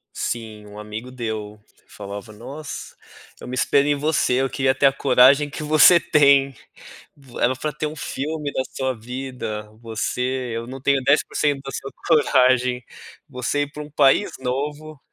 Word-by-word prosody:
Sim, 110 -3 -5
um 105 0 -11
amigo 105 +4 -7
deu, 110 -4 -5 0.3
falava: 100 +2 -9
"Nossa, 140 +7 -8 0.4
eu - - -10
me 125 - -4
espelho 140 +2 +2
em 145 - +2
você, 150 -2 +1
eu 135 - 0
queria 135 -1 +1
ter 140 +1 +4
a - - +4
coragem 135 +2 +5
que 150 - -7
você 155 +3 +7
tem, 140 -3 +4 0.6
vo 135 -4 -11
era 125 - +2
pra 150 +3 -3
ter 155 - -3
um 155 - -6
filme 150 +1 -4
da 130 - -1
sua 130 -1 -1
vida, 125 -2 -6
você 125 +2 -3
eu 115 0 -4
não 130 +2 -8
tenho 140 -1 +2
10% 145 +1 +1
da 135 - -5
sua 135 - -6 0.2
coragem, 130 -5 +3 0.5
você 135 +2 -2
ir 145 0 -5
pra 150 - -7
um 150 - -11
país 135 -2 +3
novo." 145 +3 -4
130 Hz, 165 wpm, -22 LUFS, 125-145 Hz, 0.6 s, você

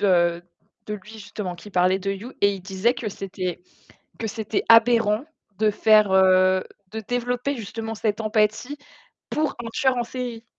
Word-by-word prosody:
de 175 -3 +3 0.4
de 210 - -3
lui 210 +1 -11
justement, 205 -3 -6
qui 190 +5 -12
parlait 185 +1 +3
de 195 +1 -2
You 205 +6 -6
et 200 0 +4
il 190 - -8
disait 195 +5 0
que 240 -3 -4
c'était 185 -3 -5 0.6
que 225 - -4
c'était 220 -1 -2
aberrant 230 0 +5 0.4
de 215 - +4
faire, 215 -1 +4
heu, 185 0 +5 0.3
de 220 - -4
développer 245 +4 -2
justement 225 0 -5
cette 215 0 -1
empathie 215 +6 0 0.5
pour 305 -1 -1
un 230 - -5
tueur 265 -4 +2
en 240 - +1
série. 240 -2 -6
215 Hz, 165 wpm, -24 LUFS, 190-235 Hz, 0.6 s, aberrant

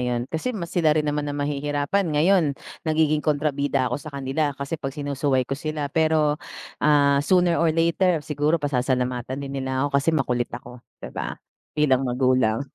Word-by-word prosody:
'yun, 120 -1 -1
kasi 160 +10 -2
mas 170 -3 -6
sila 155 -3 +3
rin 150 - +2
naman 145 0 -1
ang 145 - -3
mahihirapan 145 +5 -1
ngayon, 155 -1 +3 0.3
nagiging 155 -1 +2
kontrabida 145 -2 0
ako - - -2
sa 155 - -9
kanila 140 +1 -2
kasi 140 +3 -5
'pag 135 0 -5
sinusuway 140 -2 0
ko 135 - -6
sila 150 0 -3
pero, 155 -2 +2 0.4
ah, 140 -2 +4
sooner 175 +2 +3
or 170 - +3
later, 165 0 +2
siguro 150 +2 +1
pasasalamatan 130 -2 -1
din 135 - -6
nila 130 +1 -1
ako 140 -1 +1
kasi 140 - -3
makulit 125 -6 +1
ako, 125 0 -12 0.2
'di - - -8
ba? - - -4 0.4
Bilang 140 -4 +3
magulang. 130 -1 +2
145 Hz, 170 wpm, -24 LUFS, 135-155 Hz, 0.4 s, ah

